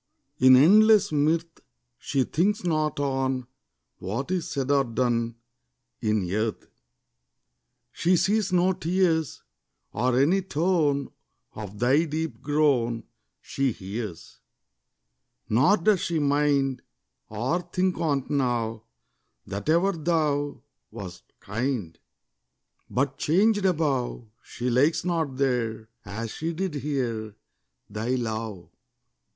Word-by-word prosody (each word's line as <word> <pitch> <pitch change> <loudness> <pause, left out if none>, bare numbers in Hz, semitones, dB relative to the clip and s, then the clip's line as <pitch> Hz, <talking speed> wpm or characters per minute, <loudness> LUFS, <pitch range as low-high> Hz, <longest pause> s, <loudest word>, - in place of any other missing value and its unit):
In 130 0 +8
endless 210 +9 +6
mirth, 160 +3 0 0.4
She 135 -2 0
thinks 195 +10 0
not 155 -4 0
on 135 -2 -1 0.5
What's 135 - -3
said 135 -1 -2
or 140 -1 +4
done 115 -1 -1 0.7
In 105 -4 0
earth: 110 +1 -2 1.3
She 180 +7 +2
sees 205 +1 +1
no 180 +1 +3
tears, 175 -4 0 0.5
Or 125 +2 +1
any 170 +8 +3
tone 155 -5 0 0.4
Of 105 -1 -8
thy 130 +8 +3
deep 155 -6 -4
groan 135 -6 +1 0.4
She 135 -1 -1
hears; 100 -2 -7 1.1
Nor 135 - +4
does 195 +2 +2
she 170 0 -1
mind, 140 -2 +1 0.5
Or 125 +12 -1
think 180 +1 -1
on't 140 -5 0
now, 120 -5 -1 0.6
That 100 +9 -5
ever 170 +5 +3
thou 155 -4 -1 0.3
Wast 90 -3 -9
kind: 110 -5 -3 0.9
But 135 +1 -1
changed 205 +5 +2
above, 140 -9 -1 0.2
She 125 - -6
likes 145 +8 +2
not 160 -7 -1
there, 115 -5 -1
As 110 +2 -5
she 165 +6 -3
did 185 0 -3
here, 125 -7 -3 0.5
Thy 110 +5 -2
love. 110 -5 -4
140 Hz, 105 wpm, -26 LUFS, 115-165 Hz, 1.3 s, In